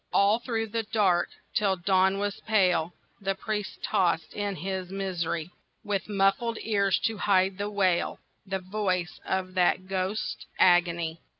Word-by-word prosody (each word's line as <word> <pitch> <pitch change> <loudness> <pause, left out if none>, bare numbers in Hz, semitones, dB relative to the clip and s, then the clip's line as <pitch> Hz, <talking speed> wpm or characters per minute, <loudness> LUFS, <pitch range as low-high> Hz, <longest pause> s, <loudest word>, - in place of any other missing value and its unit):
All 200 +3 +4
through 225 -2 -2
the 230 +2 -1
dark, 205 -5 +2 0.2
till 200 -2 +2
dawn 190 +1 +2
was 205 0 -2
pale, 180 -6 +2 0.3
The 195 0 -1
priest 210 +1 -4
tossed 180 -5 +1
in 205 -1 -2
his 185 +1 -4
misery, 180 -4 -3 0.3
With 205 0 -2
muffled 200 +3 +1
ears 200 -3 +2
to 225 -2 -1
hide 190 -1 +2
the 205 +1 -1
wail, 190 -4 +1 0.3
The 195 -1 -2
voice 185 -2 -2
of 185 -1 -2
that 185 0 +2
ghost's 190 +2 -2
agony. 170 -2 +3
195 Hz, 140 wpm, -27 LUFS, 185-205 Hz, 0.3 s, All